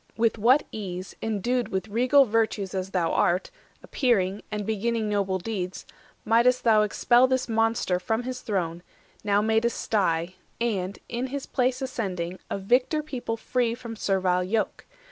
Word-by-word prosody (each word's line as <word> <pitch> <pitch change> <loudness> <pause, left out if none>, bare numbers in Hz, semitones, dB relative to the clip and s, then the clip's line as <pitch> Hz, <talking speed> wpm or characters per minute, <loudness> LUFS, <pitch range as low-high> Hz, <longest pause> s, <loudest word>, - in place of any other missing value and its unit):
With 230 -1 +1
what 255 +7 +4
ease, 185 -3 -6
Endued 230 +3 -1
with 190 +2 -2
regal 255 +6 +4
virtues 215 -4 0
as 190 0 -3
thou 180 -4 0
art, 180 - +1 0.3
Appearing, 205 -7 +1
and 210 -1 -3
beginning 220 +1 -1
noble 195 -2 0
deeds, 185 -2 -4 0.4
Might'st 235 +3 +3
thou 220 -2 +5
expel 240 +4 +4
this 260 -1 0
monster 225 -5 +1
from 220 +5 -1
his 255 0 -5
throne, 175 -5 -2 0.4
100 - - -37
Now 205 -1 +2
made 220 +1 +2
a - - +4
sty, 185 -7 0 0.3
and, 200 -5 -1
in 240 +2 -3
his 275 +1 -5
place 255 0 0
ascending, 185 -8 -3
A - - -2
victor 250 +9 +1
people 245 -6 -4
free 235 0 0
from 235 -2 -8
servile 185 -3 +1
yoke! 215 +4 -2
220 Hz, 160 wpm, -26 LUFS, 190-240 Hz, 0.4 s, thou